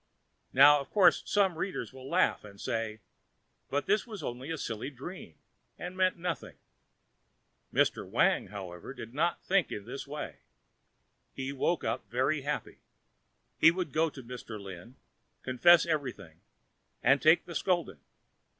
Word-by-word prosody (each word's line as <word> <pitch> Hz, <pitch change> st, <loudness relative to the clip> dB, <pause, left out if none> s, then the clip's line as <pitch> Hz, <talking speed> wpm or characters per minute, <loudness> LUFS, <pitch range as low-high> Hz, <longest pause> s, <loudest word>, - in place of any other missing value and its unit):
Now, 145 Hz, 0 st, +8 dB
of 140 Hz, -, -7 dB
course, 200 Hz, -3 st, +5 dB
some 190 Hz, -5 st, +2 dB
readers 190 Hz, -6 st, -3 dB
will 130 Hz, 0 st, -10 dB
laugh 180 Hz, +2 st, +2 dB
and 100 Hz, -1 st, -13 dB
say, 110 Hz, -1 st, -3 dB, 0.7 s
"But 145 Hz, +1 st, -1 dB
this 210 Hz, +4 st, +1 dB
was 210 Hz, -8 st, -7 dB
only 125 Hz, +4 st, -5 dB
a 165 Hz, -, -2 dB
silly 115 Hz, -1 st, -4 dB
dream, 140 Hz, -, -9 dB, 0.4 s
and 180 Hz, +1 st, -6 dB
meant 185 Hz, -1 st, +2 dB
nothing." 175 Hz, 0 st, -4 dB, 1.1 s
Mr. -, -, +1 dB
Wang, -, -, +2 dB
however, 95 Hz, +4 st, -8 dB
did 115 Hz, -2 st, -9 dB
not 165 Hz, +5 st, 0 dB
think 195 Hz, -2 st, +2 dB
in 100 Hz, -, -5 dB
this 135 Hz, +4 st, -7 dB
way. 150 Hz, +1 st, -6 dB, 1.0 s
He 135 Hz, +1 st, -4 dB
woke 160 Hz, +5 st, 0 dB
up 110 Hz, -2 st, -3 dB
very 130 Hz, +6 st, +1 dB
happy. 145 Hz, +2 st, -4 dB, 0.8 s
He 165 Hz, -, +8 dB
would 170 Hz, -3 st, -2 dB
go 160 Hz, +1 st, +2 dB
to 135 Hz, -3 st, -11 dB
Mr. 115 Hz, -3 st, -8 dB
Lin, 95 Hz, +4 st, -10 dB, 0.5 s
confess 165 Hz, +8 st, +5 dB
everything 125 Hz, -, -4 dB, 0.6 s
and 140 Hz, 0 st, +4 dB
take 160 Hz, +2 st, +5 dB
the 170 Hz, -, -8 dB
scolding. 170 Hz, -, 0 dB
140 Hz, 145 wpm, -30 LUFS, 115-170 Hz, 1.1 s, Now